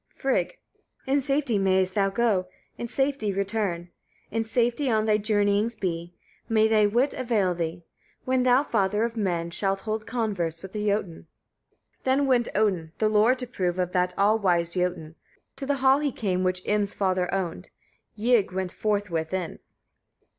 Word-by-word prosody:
Frigg. 270 - -1 0.5
4. 265 - -1
In 280 - +3
safety 275 -5 +1
mayest 190 -1 +2
thou 195 -1 +2
go, 200 -3 +1 0.3
in 235 - -5
safety 270 -4 0
return; 195 -3 -2 0.4
in 225 - 0
safety 240 +4 0
on 220 -2 +2
thy 215 -1 +3
journeyings 205 +1 +1
be; 170 -2 -4 0.3
may 220 -1 +4
thy 215 -1 +4
wit 245 +7 +2
avail 220 -8 0
thee, 170 0 -4 0.4
when 255 0 +2
thou, 250 +2 +4
father 210 -4 +1
of 230 0 -2
men! 175 -6 -1
shalt 195 +2 -1
hold 215 -1 -4
converse 195 -9 -2
with 190 - -8
the 210 0 -3
Jötun. 200 -5 -2 0.7
5. - - -41
Then 265 +2 +2
went 250 -3 +2
Odin 185 -6 0
the 215 - +2
lore 215 +4 +4
to 255 -1 -5
prove 185 -7 -2
of 180 -1 -1
that 180 -1 0
all 210 +3 +3
wise 175 -4 +1
Jötun. 180 -3 -2 0.4
To 270 - -5
the 285 - +2
hall 265 +1 +6
he 295 -2 0
came 185 -6 -1
which 185 0 0
Im's 205 -1 0
father 185 -2 0
owned. 185 -2 -3 0.5
Ygg 225 -2 +2
went 185 -1 -3
forthwith 190 -6 -1
in. 180 -3 -4
205 Hz, 170 wpm, -26 LUFS, 185-235 Hz, 0.7 s, hall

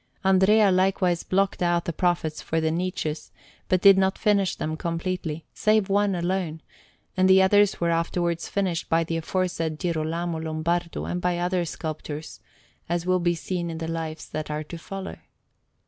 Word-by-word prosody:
Andrea 190 +2 +5
likewise 185 -1 +2
blocked 195 0 0
out 175 -1 +1
the 170 - -2
Prophets 170 -3 0
for 165 - -1
the 160 0 0
niches, 165 -3 -3 0.4
but 185 -1 +2
did 195 -1 +7
not 190 0 +1
finish 200 -3 +2
them 155 0 -3
completely, 165 -1 -3
save 215 -2 +2
one 200 -1 +2
alone, 175 -2 -2 0.5
and 185 0 +3
the 190 0 +7
others 205 +1 +4
were 170 -1 +1
afterwards 170 0 -1
finished 185 -4 -1
by 165 0 +3
the 165 0 -2
aforesaid 165 -2 -2
Girolamo 165 -1 -2
Lombardo 165 +2 -2
and 180 - -3
by 180 -1 0
other 175 0 0
sculptors, 155 -1 -6 0.5
as 175 0 -1
will 185 0 +2
be 175 0 +1
seen 170 +3 -3
in 165 - -5
the 160 0 -4
Lives 160 -1 -4
that 155 -1 -4
are 150 0 -3
to 165 +3 -8
follow. 195 +3 -7
175 Hz, 165 wpm, -25 LUFS, 165-190 Hz, 0.5 s, did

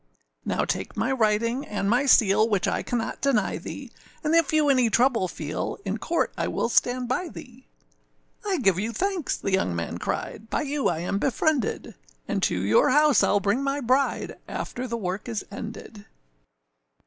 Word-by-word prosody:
âNow - - 0
take - - -3
my 250 - 0
writing 230 +1 +1
and 205 -5 -3
my 245 +6 +2
seal, 215 -2 +5
Which 200 -4 +1
I - - 0
cannot 235 -2 -3
deny 245 -8 +1
thee, - - -8 0.3
And 310 +1 +1
if 330 -3 +4
you 310 -1 +3
any 255 -4 +4
trouble 235 -3 +2
feel, 155 -3 -4
In 200 +3 -2
court 335 +7 -1
I - - -1
will - - -1
stand 245 +1 +1
by 325 +8 -1
thee.â 265 - -13
âI 265 - -4
give 190 -3 +3
you 225 +3 -2
thanks,â 375 - -2
the 195 - -1
young 95 - +1
man 85 0 -4
cried, 220 +2 -4
âBy - - -1
you 285 0 0
I 165 -1 -1
am 195 +3 -1
befriended, 275 +1 0 0.3
And - - -1
to 90 - +1
your 105 +3 +4
house 295 +1 +5
Iâll 205 -1 +2
bring 205 +6 +1
my 275 +1 -1
bride 260 +2 0
After 255 +1 -5
the 235 -1 -3
work 195 +2 -4
is 220 -3 -3
ended. 210 0 -8
235 Hz, 180 wpm, -25 LUFS, 205-275 Hz, 0.3 s, seal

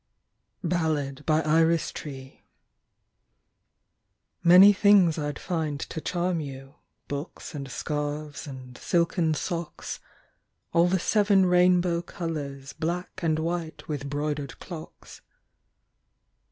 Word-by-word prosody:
62 155 -5 -1
IRIS 160 +1 +3
TREE. 140 -3 -7
BALLAD. 130 0 -15 2.0
MANY 185 +4 +9
things 195 -5 +5
I'd 145 -1 -3
find 160 -5 -2
to 160 - -5
charm 175 0 -1
you, 135 -2 -8 0.3
Books 145 +5 -6
and 140 -2 -6
scarves 150 +1 -4
and 130 -2 -9
silken 170 -2 +1
socks, 170 +1 -4 0.7
All 170 +1 +5
the 185 +1 +2
seven 200 0 +3
rainbow 180 -1 +3
colours 145 -6 -5
Black 175 +4 -4
and 160 -2 +1
white 165 0 -3
with 145 -2 -4
'broidered 145 -1 -3
clocks. 165 -4 -10
160 Hz, 100 wpm, -27 LUFS, 145-175 Hz, 2.0 s, MANY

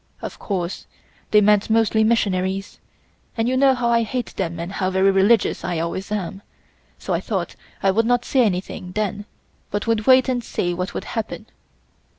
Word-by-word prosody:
Of - - -7
course 180 -3 -4 0.4
they 210 - +5
meant 210 0 +3
mostly 220 0 +3
missionaries, 195 -3 0 0.6
and 225 +1 +1
you 255 - +1
know 265 0 +4
how 245 -1 0
I 235 0 +4
hate 240 +2 -3
them 170 -3 -3
and 170 +2 -5
how 185 -1 -1
very 190 +1 +3
religious 200 +4 +3
I 175 -2 -2
always 170 +5 -3
am, 195 -2 -3 0.6
so - - -3
I - - +1
thought - - -3 0.3
I 195 - +4
would 225 +4 +1
not 245 0 +2
say 265 - +2
anything 180 -2 -3
then 205 0 -2 0.4
but 205 0 -2
would 225 -2 0
wait 260 0 +6
and 250 -2 -1
see 175 -5 -2
what 180 +2 -4
would - - -3
happen. 225 -2 -5
210 Hz, 180 wpm, -22 LUFS, 190-230 Hz, 0.6 s, wait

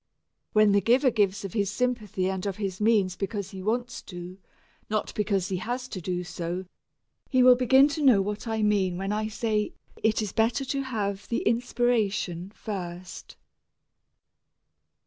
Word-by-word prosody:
When 215 -1 +5
the 200 0 +4
giver 250 +6 +4
gives 205 -3 +1
of 195 - -6
his 200 -3 0
sympathy 210 -5 -1
and 190 +1 -2
of 195 - -2
his 195 -2 -4
means 205 -4 +3
because 195 0 -4
he 190 -2 -7
wants 240 +4 -2
to, 180 0 -8 0.5
not 215 -1 -1
because 200 -3 0
he 190 - -1
has 245 +6 -3
to 185 - -5
do 180 +1 -2
so, 175 +1 -4 0.6
he 255 -2 +4
will 250 0 +9
begin 265 +2 +5
to 300 +1 -3
know 250 -7 +6
what 205 +4 -3
I 220 -1 -1
mean 195 -4 +2
when 195 +2 -2
I 215 +1 -1
say 215 -1 -1 0.3
it 220 0 +2
is 205 - -5
better 230 +4 +1
to 275 +1 -1
have 205 -6 -3
the 235 - -1
inspiration 225 -7 0
first. 180 -3 -7
210 Hz, 165 wpm, -27 LUFS, 190-235 Hz, 0.6 s, will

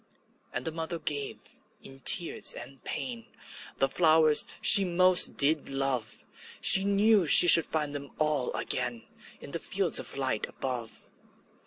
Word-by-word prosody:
'' - - -42
And - - -6
the 160 - -2
mother 165 +1 -7
gave, 145 -3 -4 0.5
in 135 0 -15
tears 170 +5 +3
and 135 -1 -13
pain, 125 -5 -8 0.5
The 135 - -1
flowers 155 -1 0
she 200 -2 +6
most 185 0 +3
did 150 +2 +1
love; 135 -5 -4 0.3
She 190 - +5
knew 200 -2 0
she 175 - +7
should 165 -1 +5
find 150 -2 -5
them 140 -1 -9
all 150 -4 -3
again 125 -2 -4 0.4
In - - -12
the - - -3
fields - - +1
of - - -8
light - - -4
above. 125 -4 -7
150 Hz, 150 wpm, -25 LUFS, 135-170 Hz, 0.5 s, she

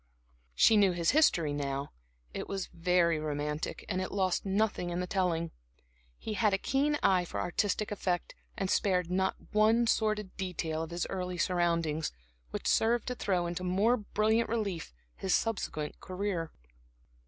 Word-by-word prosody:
She 220 - +6
knew 195 -3 +5
his 170 -1 +2
history, 175 - +3
now. 140 -1 -3 0.4
It - - -4
was 195 -2 -2
very 170 -1 +2
romantic, 150 0 -3
and 185 - -1
it 185 - -4
lost 190 -1 0
nothing 195 -2 0
in 175 0 -2
the 180 - -1
telling. 175 -3 0 0.7
He 220 - -5
had 210 -2 +3
a - - 0
keen 285 +7 +1
eye 185 -2 +4
for 175 - -5
artistic 205 +3 0
effect, 180 -3 -2 0.2
and 195 0 -1
spared 180 -5 +1
not 190 +1 +1 0.2
one 220 +3 +4
sordid 215 -3 0
detail 165 -4 -2
of 165 - -4
his 170 0 -2
early 180 -1 -3
surroundings 170 -3 +1 0.4
which - - -5
served 230 +1 +3
to 250 - -2
throw 185 -6 0
into 175 +1 -3
more 195 +7 +3
brilliant 220 +1 +1
relief 205 -7 -2 0.2
his 190 - +1
subsequent 165 -9 -2
career. 185 -3 -3
185 Hz, 155 wpm, -31 LUFS, 170-210 Hz, 0.7 s, She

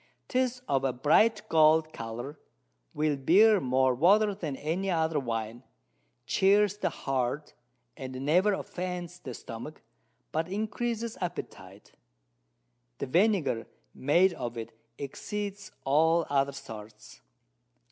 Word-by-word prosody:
'Tis 255 -1 0
of 135 -1 +1
a 135 - +2
bright 155 - +3
gold 155 -1 +4
Colour, 120 +6 -6 0.5
will 150 -1 0
bear 195 +10 +5
more 130 -1 +2
Water 200 - +4
than 165 -8 -4
any 170 +8 -2
other 160 -3 +1
Wine, 115 -2 -4 0.6
chears 205 +1 +3
the - - 0
Heart, 135 +2 -2 0.4
and 130 0 -6
never 180 +8 +4
offends 180 -2 -5
the 125 -7 -7
Stomach, 115 +5 -9 0.5
but 160 +1 -1
increases 225 +3 -3
Appetite. 175 -1 -7 1.1
The - - -3
Vinegar 155 - +1 0.3
made 175 +7 +3
of 120 -6 -5
it 115 - -6 0.3
exceeds 200 +8 -5
all 160 +4 +3
other 140 0 +2
sorts. 110 -5 -11
155 Hz, 115 wpm, -29 LUFS, 130-195 Hz, 1.1 s, bear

